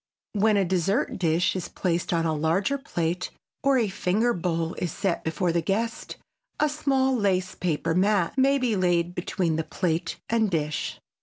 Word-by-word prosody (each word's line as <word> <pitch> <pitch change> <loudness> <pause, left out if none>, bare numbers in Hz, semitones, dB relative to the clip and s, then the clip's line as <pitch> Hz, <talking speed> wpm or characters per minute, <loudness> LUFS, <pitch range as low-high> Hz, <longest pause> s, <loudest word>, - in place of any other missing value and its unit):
When 210 0 +3
a 195 - +3
dessert 190 - 0
dish 170 +1 +2
is 185 - -3
placed 175 -2 -1
on 165 -1 +1
a 160 - +1
larger 170 - +1
plate, 175 -7 -2 0.3
or 275 -1 +3
a 230 -4 +2
finger 205 +5 +1
bowl 165 -1 -1
is 175 - -2
set 195 -2 -1
before 170 +2 0
the 170 0 +1
guest, 225 +7 -2 0.4
a 300 - +3
small 270 -3 +1
lace 190 -5 +1
paper 165 -2 -1
mat 190 0 +2
may 275 +1 +4
be 250 -5 +1
laid 175 -2 +1
between 175 -2 -1
plate 170 -3 -1
and 225 -2 +2
dish. 155 -3 -2
185 Hz, 165 wpm, -26 LUFS, 170-220 Hz, 0.4 s, may